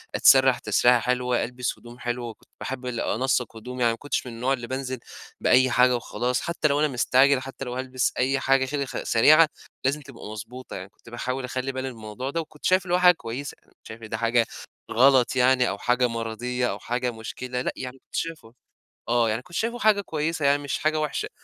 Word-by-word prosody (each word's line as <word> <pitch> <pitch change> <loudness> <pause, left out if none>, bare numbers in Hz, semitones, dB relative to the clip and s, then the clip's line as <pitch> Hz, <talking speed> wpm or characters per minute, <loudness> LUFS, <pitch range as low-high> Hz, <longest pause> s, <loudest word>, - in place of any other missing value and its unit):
أتسرّح 130 -1 +6
تسريحة 120 +3 +4
حلوة، 125 +1 0
ألبس 125 +1 -4
هدوم 120 +1 -13
حلوة، 120 0 -3
وكنت 110 - -15
باحبّ 130 -1 -5
ال 120 -2 -3
أنسّق 125 -2 0
هدومي، 125 +3 -7
يعني 120 -1 +4
ما - - -7
كنتش 145 -1 -3
من 120 - -7
النوع 125 +4 0
اللي 120 -3 -4
بانزل 130 -1 -4 0.4
بأيّ 130 0 +4
حاجة 125 0 +4
وخلاص، 120 +1 -2
حتّى 170 -2 0
لو 145 0 +1
أنا 155 - +3
مستعجل، 130 +1 +3
حتّى 135 0 -7
لو 125 0 -5
هالبس 130 -1 -1
أيّ 135 +2 +2
حاجة 135 0 +3
خ - - -8
كده 140 -2 -3
سريعة، 155 +7 +6 0.4
لازم 145 +3 +1
تبقى 135 -4 -12
مضبوطة، 115 +4 -8
يعني 95 +1 -7
كنت 115 - -18
باحاول 125 +2 -3
أخلي 130 +1 -3
بالي 130 0 -4
من - - -13
الموضوع 110 +5 -6
ده، 165 +3 -1
وكنت 155 -1 -12
شايف 185 0 +4
اللي 175 - -2
هو - - +2
حاجة 180 -1 +7
كويّسة، 125 +2 -6
يعني - - -34
مكنتش - - -19
شايف 115 +1 -10
إن 110 - -8
ده 115 - -2
حاجة 115 0 +2 0.5
غلط 130 +1 +4
يعني 125 0 +4
أو 95 - -3
حاجة 125 +2 +2
مَرضيّة 120 +2 -2
أو - - -4
حاجة 125 +1 -2
مُشكلة، 125 +3 -5
لأ، - - -1
يعني 130 0 -7
كنت - - -15
شايفُه 155 -9 -4 0.6
آه، 120 -2 +3
يعني 115 +3 -1
كنت 175 +2 -13
شايفُه 235 +2 -1
حاجة 215 -4 +4
كويّسة، 155 -3 -2
يعني 145 +1 +3
مش 140 - -2
حاجة 155 0 0
وحشة. 150 -2 -2
125 Hz, 220 wpm, -25 LUFS, 120-135 Hz, 0.6 s, حاجة